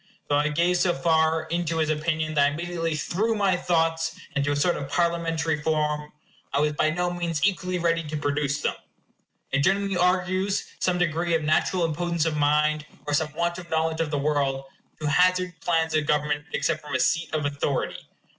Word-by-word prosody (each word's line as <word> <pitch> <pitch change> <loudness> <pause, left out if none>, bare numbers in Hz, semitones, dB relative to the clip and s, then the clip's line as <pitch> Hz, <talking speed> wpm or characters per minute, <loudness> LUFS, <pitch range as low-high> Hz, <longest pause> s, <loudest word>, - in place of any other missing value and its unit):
Though 145 - +3
I 150 +1 +2
gave 170 +4 +2
so 175 -1 +2
far 160 -1 +2
in 170 +2 -2
to 165 0 -1
his 155 -1 +1
opinion 155 0 -1
that 145 -2 +4
I 145 - -1
immediately 165 0 -2
threw 215 +9 0
my 200 -3 +2
thoughts 165 -2 0 0.2
into 140 +1 +1
a - - +1
sort 160 +5 +2
of 140 - -5
Parliamentary 165 -2 0
form, 150 -1 -1 0.4
I 140 - +1
was 150 +1 +2
by 155 +1 +2
no 175 +2 -1
means 170 -2 -1
equally 185 -2 0
ready 165 -1 +1
to 155 0 -4
produce 145 0 -1
them. - - 0 0.8
It 140 - +2
generally 195 +5 +1
argues 185 +2 +1
some 180 -1 +1
degree 170 0 +1
of 160 - 0
natural 165 +3 +2
impotence 170 0 -1
of 160 -2 0
mind, 150 +1 +2 0.2
or 145 - -2
some 150 +1 +1
want 170 +1 -1
of 175 -2 -11
knowledge 160 0 0
of 160 - -1
the 145 - -1
world, 140 -2 0 0.4
to 155 - -2
hazard 180 +3 +3
plans 165 -2 +1
of 155 -2 +1
government 150 0 0
except 155 -2 0
from 145 -2 -5
a - - +1
seat 170 0 +1
of 155 -2 -1
authority. 140 -1 -2
160 Hz, 195 wpm, -25 LUFS, 150-175 Hz, 0.8 s, that